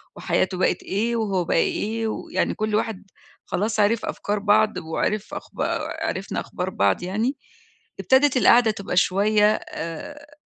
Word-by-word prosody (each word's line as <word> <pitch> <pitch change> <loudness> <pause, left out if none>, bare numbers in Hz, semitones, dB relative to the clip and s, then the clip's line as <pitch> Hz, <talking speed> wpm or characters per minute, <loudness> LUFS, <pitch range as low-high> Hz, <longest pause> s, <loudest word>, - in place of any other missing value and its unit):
وحياته 185 0 0
بقِت 180 - +1
إيه 230 +5 -1
وهو 195 -5 0
بقى - - +1
إيه، 225 +5 0
ويعني - - -2
كُلّ 215 0 -1
واحد 215 -2 -2 0.4
خلاص 215 +2 -1
عرف 210 +2 +2
أفكار 205 0 -2
بعض 210 +1 +3
وعرف 195 +6 -2
أخبا - - -4 0.4
عرفنا 190 -6 -3
أخبار 180 +1 -4
بعض 100 - +1
يعني، 220 +9 -1 0.6
ابتدت 265 0 +3
القعدة 235 -2 +5
تبقى 200 -3 -5
شوية 210 +3 +4 0.2
آآ، 285 - -7
210 Hz, 135 wpm, -23 LUFS, 190-225 Hz, 0.6 s, القعدة